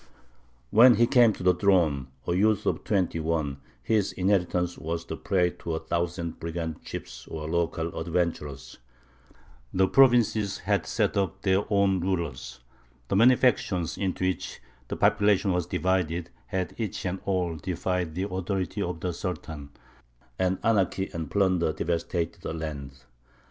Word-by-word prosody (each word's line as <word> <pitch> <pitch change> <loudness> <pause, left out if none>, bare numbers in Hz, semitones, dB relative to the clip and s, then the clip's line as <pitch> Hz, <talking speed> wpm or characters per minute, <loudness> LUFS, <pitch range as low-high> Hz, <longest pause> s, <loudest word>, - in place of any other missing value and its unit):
When 120 +2 +8
he 120 - +4
came 120 -2 +5
to - - -8
the 90 0 +5
throne, 85 -8 +2 0.2
a 85 - +1
youth 105 +3 +2
of - - 0
twenty 95 -5 0
one, 80 -4 -1 0.3
his 105 - +1
inheritance 90 -2 +1
was 85 +1 -4
the - - -5
prey 90 -3 +1
to 85 -1 -3
a - - -2
thousand 85 +1 -3
brigand 80 -1 -4
chiefs 60 0 -8
or 75 -1 -6
local 85 0 -1
adventurers; 80 -6 -3 0.9
the 95 0 +3
provinces 115 -5 +4
had 100 -6 -1
set - - 0
up 95 0 -1
their 95 +2 +1
own 100 -2 +3
rulers; 70 -9 -3 0.5
the - - +1
many 120 +5 +7
factions 95 -9 +1
into 95 -1 -2
which 95 - -3 0.3
the - - -4
population 100 -1 +3
was 90 -1 -1
divided 90 -2 -1 0.2
had 95 -3 -2
each 110 -4 -3
and 95 +1 -2
all 90 -4 0
defied 90 -1 -2
the 95 +2 -1
authority 95 +1 -3
of 90 -4 -3
the 90 -1 -2
Sultan; 80 -5 -5 0.7
and 95 0 +1
anarchy 100 -3 +1
and 80 -3 -4
plunder 95 -5 +2
devastated 85 +1 -2
the 80 - -4
land. 70 -4 -6
90 Hz, 150 wpm, -27 LUFS, 80-95 Hz, 0.9 s, When